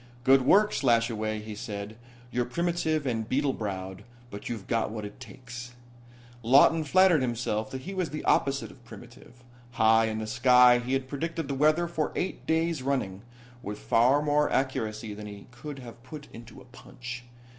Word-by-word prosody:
"Good 135 +1 +6
work, 205 +11 +4
Slashaway," 115 -4 +1
he 110 0 -7
said. 105 0 -6 0.4
"You're 125 0 0
primitive 160 +1 -1
and 115 -4 -2
beetle 140 0 +1
browed, 95 -3 -5 0.3
but 100 - -7
you've 110 -5 -5
got 115 -2 0
what 110 -1 -5
it 105 - -10
takes." 120 -1 -10 0.7
Lawton 140 +7 +5
flattered 180 0 +4
himself 115 -3 -2
that 130 - -6
he 195 - -6
was 185 -4 -2
the 150 +2 -6
opposite 140 0 +1
of 125 - -19
primitive. 120 +1 -14 0.3
High 110 -1 +4
in 110 -1 -2
the 110 - -3
sky 125 +1 +5
he 125 +2 -3
had 135 -1 -1
predicted 160 +2 -4
the 140 - -2
weather 155 +5 +3
for 160 -3 -2
eight 185 - -3
days 160 -2 +1
running, 130 -8 -2 0.4
with 105 -1 -6
far 130 +8 +3
more 150 0 +2
accuracy 110 -5 -2
than 105 0 -8
he 100 -1 -10
could 140 +4 -8
have 120 -2 -11
put 145 +3 -10
into 115 +2 -12
a 130 - -15
punch. 125 0 -9
125 Hz, 175 wpm, -28 LUFS, 110-145 Hz, 0.7 s, Good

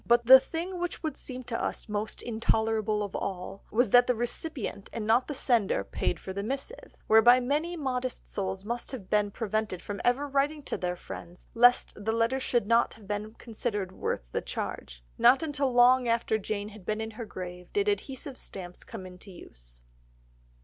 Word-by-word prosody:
But 235 0 +3
the 260 +2 +11
thing 350 +5 -5
which 350 0 -4
would 310 -3 -2
seem 255 -1 -6
to 235 -1 -3
us - - -3
most 210 0 -3
intolerable 220 -2 0
of 200 - -6
all, 190 +1 -4
was 230 -1 +2
that 245 0 +7
the 250 - +2
recipient 240 -2 -3
and 225 -2 -4
not 230 +4 +3
the 295 - -4
sender 230 - +2
paid 90 -2 -2
for 190 - -7
the 200 - -3
missive, 275 - -5
whereby 240 +3 +7
many 300 +7 -1
modest 255 -4 -3
souls 190 0 -3
must 240 +2 -3
have 200 -8 -8
been 210 -1 +3
prevented 215 -3 -2
from 200 +3 -6
ever 265 +4 +2
writing 285 +2 0
to - - -3
their 180 -1 -2
friends 175 0 -10
lest 245 -3 +4
the 220 - +1
letter 230 +3 +1
should 240 -4 +1
not 225 -2 +1
be 205 +1 -2
considered 210 -4 -3
worth 185 - -3
the - - -1
charge. - - -5 0.2
Not 245 +5 +6
until 285 -4 0
long 245 +1 +5
after 230 -1 +1
Jane 205 0 -3
had 210 -2 -13
been 215 +4 -2
in 220 0 -4
her 225 +1 -7
grave 180 -3 -8
did 410 0 +1
adhesive 275 -9 -3
stamps 180 -2 -8
come 205 -5 -8
into 185 +2 -11
use. - - -12
225 Hz, 185 wpm, -29 LUFS, 200-255 Hz, 0.2 s, the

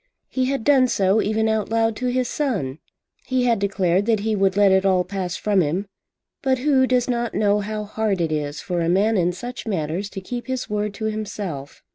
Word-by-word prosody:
He 260 -1 0
had 270 -2 -1
done 270 -2 +5
so 200 -1 +2
even 220 +1 +1
out 220 -2 0
loud 225 0 +1
to 250 - -2
his 250 0 0
son. 195 - -2 0.5
He 255 -1 +1
had 230 -3 +2
declared 195 -1 +1
that 220 -3 +2
he 220 0 0
would 195 -1 +1
"let 200 -1 +5
it 190 0 +4
all 185 -2 +3
pass 185 -1 -4
from 205 -3 +2
him." 170 +6 -1 0.6
But 265 -1 +2
who 260 -1 +3
does 250 -1 +2
not 240 -2 -1
know 205 -1 +3
how 210 +1 -3
hard 210 -2 -1
it 165 -2 0
is 150 -1 -2
for 175 -2 -2
a 165 - 0
man 205 +5 +3
in 180 -2 +2
such 240 +7 -7
matters 180 0 -2
to 195 - -6
keep 240 +5 -6
his 260 -1 -3
word 210 -1 -2
to 220 - -4
himself? 205 -10 -5
210 Hz, 215 wpm, -22 LUFS, 190-235 Hz, 0.6 s, done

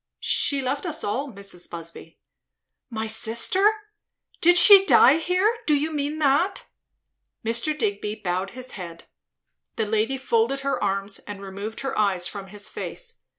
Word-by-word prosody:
she 280 -2 +2
left 275 +3 -2
us 315 -1 -4
all, 260 +7 -3
Mrs. 195 -4 -7
Busby." 165 -1 -9 0.7
"My 220 -2 -4
sister? 230 - +3 0.7
Did 350 +1 +5
she 395 +1 +9
die 290 -6 +6
here? 370 +7 +1
Do 300 - +4
you 310 +2 -1
mean 295 +1 -2
that?" 310 +7 +1 0.8
Mr. 235 +7 0
Digby 400 - -2
bowed 185 0 -3
his 255 0 -6
head. 170 -3 -9 0.7
The 220 - -1
lady 220 +5 0
folded 260 +1 0
her 275 0 -2
arms, 195 +1 -2
and 205 -1 -7
removed 200 +3 -7
her 270 - -4
eyes 190 -4 +1
from 195 +1 -8
his 205 +1 -5
face. 465 -2 -6
235 Hz, 150 wpm, -24 LUFS, 200-305 Hz, 0.8 s, she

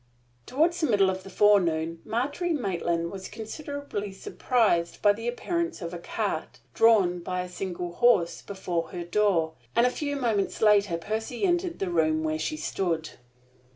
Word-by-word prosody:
Toward 320 +6 +2
the 340 -2 0
middle 200 -5 +4
of 190 0 -5
the 195 - -11
forenoon 170 -5 +3
Margery 290 +9 -1
Maitland 170 - -1
was 190 -1 -7
considerably 225 -1 -6
surprised 190 -3 0
by 205 -1 +5
the 225 +3 -6
appearance 340 +7 -2
of 170 -2 -6
a 175 - -5
cart, - - -3
drawn 200 -6 +4
by 180 +1 -3
a 180 - -5
single 180 -1 -5
horse, 205 -7 +3
before 180 -4 -3
her 175 -2 -5
door; 175 -3 +1 0.2
and 235 +1 +5
a 250 - +3
few 285 +1 -3
moments 225 -7 0
later 205 -5 +4
Percy 220 - -4
entered 350 -1 0
the 190 -2 -2
room 155 -2 +2
where 155 0 -1
she 310 - -2
stood. 165 - -2
200 Hz, 160 wpm, -27 LUFS, 175-240 Hz, 0.2 s, by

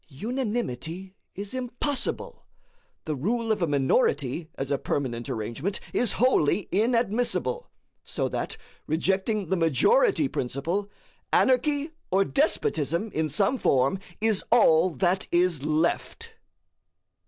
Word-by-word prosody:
Unanimity 190 - -4 0.2
is 200 +3 -6
impossible; 255 +2 -3 0.6
the 155 -3 -2
rule 225 - -1
of 210 -3 0
a 170 - +2
minority, 145 - +1
as 135 +1 -4
a 140 - +1
permanent 120 -4 -3
arrangement, 120 - -3
is 245 - +2
wholly 210 - +2
inadmissible; 235 - 0 0.3
so - - -2
that, - - -4 0.3
rejecting 190 +4 0
the 190 - +2
majority 305 - +3
principle, 170 - -2 0.4
anarchy 285 +4 +3 0.2
or 195 +1 +3
despotism 190 - 0
in 155 0 0
some 195 - +1
form 135 +8 +2 0.2
is 220 -3 +1
all 185 -7 +5
that 185 +2 0
is 175 -4 +2
left. 165 - -1
190 Hz, 110 wpm, -26 LUFS, 155-240 Hz, 0.6 s, all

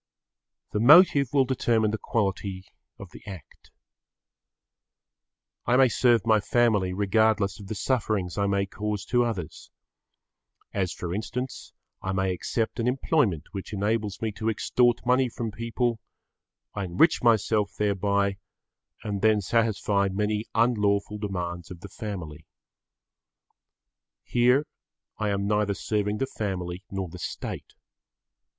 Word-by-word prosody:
The 105 - -1
motive 140 - +7
will 135 -2 +3
determine 115 -4 +1
the 110 - -3
quality 95 -3 -2 0.3
of - - -11
the - - -12
act. 95 -8 -11 2.0
I 125 - +4
may 130 -1 +6
serve 120 -1 +3
my 110 -1 +4
family 105 -4 +2
regardless 100 +1 +1
of 100 - -10
the 110 - -4
sufferings 105 -5 -1
I 100 -1 0
may 100 0 +1
cause 105 0 -4
to 120 0 +2
others. 100 -9 -5 1.0
As 95 -3 -1
for 85 0 -5
instance, 125 +6 -5 0.3
I 95 - -2
may 95 -1 0
accept 110 +6 -2
an 115 - 0
employment 125 - +1
which 100 +1 -7
enables 105 0 -1
me 110 - 0
to 110 +2 -2
extort 120 +3 +1
money 125 +1 +3
from 115 -1 -4
people, 115 +2 -2 0.7
I 100 -2 -3
enrich 90 - +3
myself 110 -3 +2
thereby 100 -1 +1 0.7
and 100 -2 -3
then 110 -1 +4
satisfy 105 -1 +1
many 105 +2 -1
unlawful 105 -3 +1
demands 90 -4 -4
of 85 -2 -10
the 100 - -9
family. 90 -8 -7 1.8
Here 125 +4 +3 0.5
I 105 -1 0
am 100 0 -1
neither 105 -1 +1
serving 105 0 -1
the 135 - 0
family 95 -7 -4
nor 95 -1 -3
the 90 +2 -10
State. - - -6
105 Hz, 130 wpm, -26 LUFS, 100-115 Hz, 2.0 s, motive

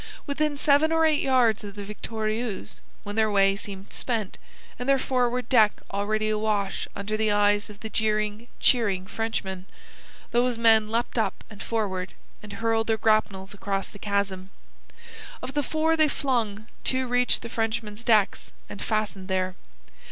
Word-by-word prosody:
Within 290 0 -1
seven 290 +2 +4
or 325 0 +4
eight 310 -2 +3
yards 245 -5 +3
of 200 -1 -8
the 205 - -6
Victorieuse, 215 - -4 0.2
when 205 0 -6
their 220 -1 +3
way 195 -1 +4
seemed 195 -1 -9
spent, 225 -6 -2 0.4
and 245 +2 -3
their 275 - +5
forward 250 -2 0
deck 220 -5 +5 0.2
already 215 +2 0
awash 210 -2 -1
under 205 +2 -3
the 215 0 +1
eyes 205 +1 +3
of 210 0 -12
the 220 - -5
jeering, 215 +1 0
cheering 205 -7 +3
Frenchmen, 195 -3 -3 0.7
those 240 0 +2
men 220 -2 +5
leapt 235 +1 -1
up 220 - -1
and 210 - -10
forward, 195 -5 -2 0.3
and 210 -1 -10
hurled 225 +1 0
their 225 -1 +2
grapnels 210 -3 +1
across 195 -1 -2
the 205 - -13
chasm. 200 -2 -2 0.9
Of 265 - -6
the 295 - +1
four 315 +3 +1
they 310 -1 +4
flung, 230 -7 -1 0.2
two 260 0 0
reached 245 0 +2
the - - -5
Frenchman's 225 -1 -2
decks, 215 -4 +2 0.2
and 200 - -8
fastened 215 -3 -2
there. 185 -1 0
215 Hz, 160 wpm, -26 LUFS, 205-240 Hz, 0.9 s, their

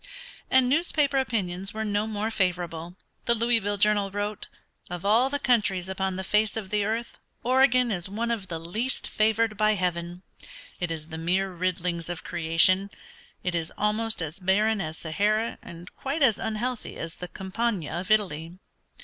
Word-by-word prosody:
And 260 -1 +5
newspaper 290 -1 +2
opinions 195 -6 -2
were 220 0 -2
no 205 +1 0
more 215 +1 -2
favorable. 175 -4 -1 0.3
The 235 - +3
Louisville 225 -3 +2
Journal 205 0 +3
wrote, 205 +1 -4 0.4
"Of 180 +1 -5
all 230 +6 +4
the 285 - 0
countries 205 -9 +2
upon 190 0 -2
the 190 - -3
face 210 +3 +2
of 205 -3 -5
the 210 -1 +2
earth 225 +3 -3 0.2
Oregon 255 -1 +4
is 180 -2 -2
one 230 +4 -2
of 210 -5 -2
the 170 -3 -4
least 215 +11 -2
favored 220 0 +2
by 215 0 +3
heaven. 175 -1 -2 0.6
It 175 - -1
is 160 -1 -5
the 160 -1 -5
mere 185 +4 +1
riddlings 175 -1 -1
of 175 -2 -5
creation. 175 +3 +3 0.5
It 180 - -1
is 165 -1 -2
almost 215 -2 0
as 160 +4 -6
barren 205 +3 +2
as 155 -1 -4
Sahara 210 +7 0
and 170 +1 -11
quite 280 +3 -1
as 230 -6 +4
unhealthy 225 +2 -3
as 165 0 -6
the 180 - -6
Campagna 195 -2 -2
of 185 +3 -6
Italy. 180 -5 +1
200 Hz, 165 wpm, -27 LUFS, 175-225 Hz, 0.6 s, And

